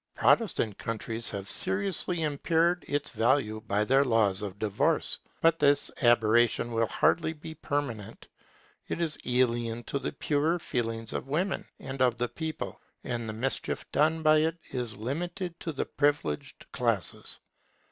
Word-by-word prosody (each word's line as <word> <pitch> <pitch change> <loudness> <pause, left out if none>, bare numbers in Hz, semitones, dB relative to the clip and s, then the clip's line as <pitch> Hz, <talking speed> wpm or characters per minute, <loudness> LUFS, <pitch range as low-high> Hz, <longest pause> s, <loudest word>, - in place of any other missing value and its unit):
Protestant 120 - +2
countries 115 +1 -1
have 100 -1 -5
seriously 190 - +3
impaired 165 +3 +1
its 145 0 -2
value 115 -3 +1
by 105 +1 +2
their 135 +5 +4
laws 110 -6 +2
of 100 -2 -5
divorce. 105 -1 0 0.2
But 165 0 +4
this 145 0 +3
aberration 120 0 +3
will 115 0 +1
hardly 160 +6 +2
be 160 +1 -9
permanent. 140 -9 -4 0.6
It - - -3
is 165 -3 -1
alien 120 -2 +1
to 140 - -2
the - - -3
purer 150 +4 +1
feelings 115 -7 -3
of - - -4
women 175 +8 -1
and 135 0 -6
of 125 -2 +3
the 120 +1 -1
people, 160 -1 -5 0.2
and 120 -2 -3
the - - -4
mischief 130 +5 -2
done 160 +2 +2
by 155 0 +6
it 160 +2 0
is 120 -5 -4
limited 170 - -4
to 165 - -4
the 140 - -2
privileged 145 - -1
classes. - - -1
135 Hz, 145 wpm, -29 LUFS, 115-160 Hz, 0.6 s, by